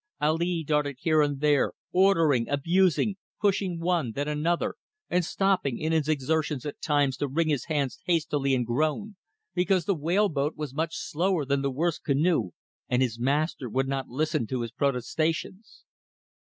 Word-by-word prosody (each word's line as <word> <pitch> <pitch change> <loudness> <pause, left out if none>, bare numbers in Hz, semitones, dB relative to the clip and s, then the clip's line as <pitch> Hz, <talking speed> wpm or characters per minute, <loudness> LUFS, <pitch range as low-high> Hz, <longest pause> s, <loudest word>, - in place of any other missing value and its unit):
Ali 165 +3 +1
darted 150 -2 0
here 155 -2 +3
and 145 -2 0
there, 150 -2 +3 0.2
ordering, 165 -10 +3
abusing, 180 +6 +2 0.2
pushing 195 -4 0
one, 165 -9 0
then 145 +4 -2
another, 150 +3 0 0.4
and 180 0 +2
stopping 185 -8 0
in 155 +1 -2
his 155 -2 +1
exertions 150 -1 0
at 145 - -6
times 145 -3 +1
to 145 - -1
wring 155 +4 0
his 140 -5 0
hands 145 -5 -1
hastily 145 -5 +1
and 125 -1 0
groan, 155 - -1 0.4
because 180 -1 +1
the 200 - +2
whale 175 +6 +2
boat 145 0 -1
was 150 -4 -5
much 160 +2 -2
slower 175 -1 0
than 140 0 0
the 140 - 0
worst 160 +5 -1
canoe 140 - +2 0.4
and 125 +1 +3
his 115 -2 -2
master 140 0 0
would 135 +4 0
not 135 -1 -2
listen 135 -3 -1
to 130 0 -2
his 115 -1 -4
protestations. 155 - -2
150 Hz, 165 wpm, -27 LUFS, 140-170 Hz, 0.4 s, here